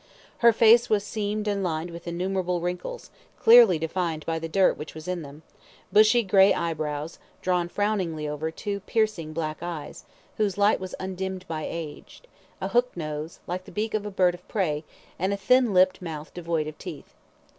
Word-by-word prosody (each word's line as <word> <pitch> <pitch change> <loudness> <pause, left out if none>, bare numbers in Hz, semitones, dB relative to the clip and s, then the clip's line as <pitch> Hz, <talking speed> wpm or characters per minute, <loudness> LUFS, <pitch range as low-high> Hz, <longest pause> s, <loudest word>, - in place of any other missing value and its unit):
Her 235 -1 +7
face 230 +2 +5
was 210 -2 +2
seamed 210 0 -3
and 200 -1 0
lined 165 -1 -2
with 170 +1 -10
innumerable 180 +1 -1
wrinkles, 180 - -5 0.3
clearly 225 -6 +8
defined 160 -1 -2
by 165 0 -1
the 165 0 -5
dirt 190 +2 +3
which 155 - -9
was 160 +2 -9
in 180 -1 -2
them; 145 +1 -11 0.5
bushy 215 +3 +6
grey 195 0 +5
eyebrows, 155 -1 -3 0.2
drawn 180 -2 +1
frowningly 185 -7 -1
over 150 +2 -3
two 200 +5 -4
piercing 210 -6 -1
black 155 -1 -3
eyes, 165 -4 -6 0.3
whose 205 -3 0
light 205 +1 +4
was 185 -1 -6
undimmed 190 0 -4
by 155 -2 -4
age; 160 - -8 0.4
a - - -3
hook 245 -4 +1
nose, 155 0 -5
like 185 +1 -4
the - - -12
beak 215 +1 -2
of 215 -1 0
a - - -3
bird 185 -3 +2
of 180 +1 -13
prey, 155 -7 -1 0.4
and 190 +3 0
a - - -2
thin 245 +4 +3
lipped 185 0 +4
mouth 160 -3 -7
devoid 165 -3 -2
of 155 0 -8
teeth. - - -9
180 Hz, 180 wpm, -26 LUFS, 160-205 Hz, 0.5 s, clearly